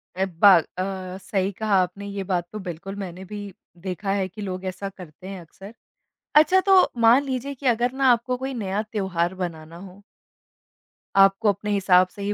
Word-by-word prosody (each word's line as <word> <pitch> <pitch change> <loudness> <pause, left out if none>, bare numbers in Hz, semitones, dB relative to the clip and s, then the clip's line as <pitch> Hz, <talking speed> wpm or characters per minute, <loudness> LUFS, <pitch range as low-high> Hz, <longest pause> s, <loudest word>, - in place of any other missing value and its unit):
अ, 190 +1 0
बा 190 +2 +6 0.2
अ, 185 0 -4
सही 195 0 -1
कहा 210 +1 -1
आपने 195 +3 -7
ये 200 -1 -4
बात 180 -2 -2
तो 215 - -6
बिल्कुल 175 +4 -6
मैंने 190 -2 -7
भी 205 0 -8 0.3
देखा 195 +2 -3
है 195 -2 0
कि 210 +3 -11
लोग 185 -1 -5
ऐसा 185 +1 -4
करते 185 -2 -13
हैं 190 -3 -7
अक्सर। 195 +6 -13 0.6
अच्छा 310 +5 +6
तो 380 -1 +8 0.2
मान 235 +5 +6
लीजिए 270 +1 -4
कि 275 - -12
अगर 240 +1 +2
ना 270 0 +1
आपको 245 +2 0
कोई 265 +1 -4
नया 205 -3 -2
त्यौहार 190 -5 -2
बनाना 160 -1 -7
हो 190 +2 -14 1.2
आपको 195 +2 +4
अपने 205 +1 -2
हिसाब 185 -2 +4
से 200 - -12
ही 205 +1 -1
195 Hz, 185 wpm, -24 LUFS, 185-215 Hz, 1.2 s, तो